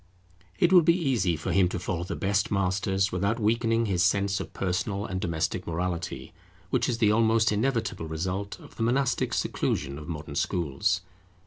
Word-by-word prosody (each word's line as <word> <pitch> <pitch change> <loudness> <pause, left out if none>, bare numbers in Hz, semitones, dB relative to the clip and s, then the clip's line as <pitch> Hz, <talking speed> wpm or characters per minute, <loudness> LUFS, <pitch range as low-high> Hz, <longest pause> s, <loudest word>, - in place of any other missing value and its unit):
It 175 +2 +3
will 180 - +9
be 170 +2 +4
easy 120 - +1
for 80 - -3
him 95 -2 +4
to - - -3
follow 90 -1 -3
the 90 - -4
best 100 +1 0
masters 95 0 +1
without 100 +6 0
weakening 115 +1 +2
his 95 -4 0
sense 100 +2 +2
of - - -6
personal 100 +2 -2
and 95 0 -3
domestic 85 +1 -2
morality, 85 +1 -3 0.4
which - - +1
is 120 - 0
the 110 -3 +3
almost 110 0 +3
inevitable 110 -6 -1
result 95 +5 -3
of - - -15
the - - -5
monastic 125 +2 +1
seclusion 70 0 -1
of 75 - -10
modern 75 -3 -6
schools. 90 +3 0
95 Hz, 175 wpm, -27 LUFS, 90-110 Hz, 0.4 s, will